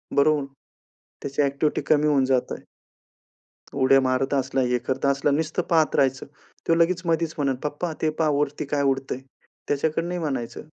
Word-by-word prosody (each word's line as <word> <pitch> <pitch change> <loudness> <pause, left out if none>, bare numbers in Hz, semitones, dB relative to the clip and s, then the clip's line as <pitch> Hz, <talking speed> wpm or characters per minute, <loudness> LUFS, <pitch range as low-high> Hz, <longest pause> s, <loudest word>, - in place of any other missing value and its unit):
बरोबर? 145 0 +3 0.8
त्याची 140 +1 -2
ॲक्टिव्हिटी 140 +2 0
कमी 150 0 +2
होऊन 140 -3 +3
जातंय. 130 -1 -1 1.1
उड्या 135 0 +4
मारत 130 +1 0
असला, 135 0 0
हे 125 -1 +1
करता 130 +3 -1
असला, 140 +1 +1
नुसतं 160 +4 0
पाहत 160 -3 +3
राहायचं. 135 -1 +1 0.4
तो 165 - +5
लगेच 175 +2 +2
मधीच 165 -1 0
म्हणेल, 135 -3 0
"पप्पा 150 +3 -3
ते 155 - +2
पहा 160 -2 +2
वरती 145 0 -1
काय 145 0 0
उडतंय?" 135 -2 -1 0.5
त्याच्याकडे 155 +3 0
नाही 180 0 -3
म्हणायचं. 135 -7 -4
140 Hz, 155 wpm, -24 LUFS, 135-155 Hz, 1.1 s, तो